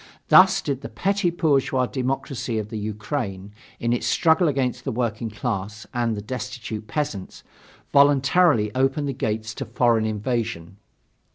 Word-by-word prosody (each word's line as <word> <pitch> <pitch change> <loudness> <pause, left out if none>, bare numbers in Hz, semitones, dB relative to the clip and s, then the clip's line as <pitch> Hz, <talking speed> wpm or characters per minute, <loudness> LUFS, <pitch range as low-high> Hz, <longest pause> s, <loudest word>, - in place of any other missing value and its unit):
Thus - - +7
did 140 -2 -2
the - - -7
petty 195 -1 0
bourgeois 140 -6 +1
democracy 130 -2 -3
of 105 -1 -3
the 110 -1 -5
Ukraine, 105 -2 -4 0.3
in 115 0 0
its 120 - -1
struggle 165 +1 +3
against 125 -4 -1
the - - -2
working 115 -1 -2
class 105 -1 -4
and 120 -3 0
the 105 - -5
destitute 110 -2 -6
peasants, 145 -11 -4 0.5
voluntarily 140 -3 +4
open 135 +3 +1
the 140 - -2
gates 110 -3 -3
to - - -5
foreign 115 -3 +2
invasion. 105 -5 -3
120 Hz, 145 wpm, -23 LUFS, 110-140 Hz, 0.5 s, Thus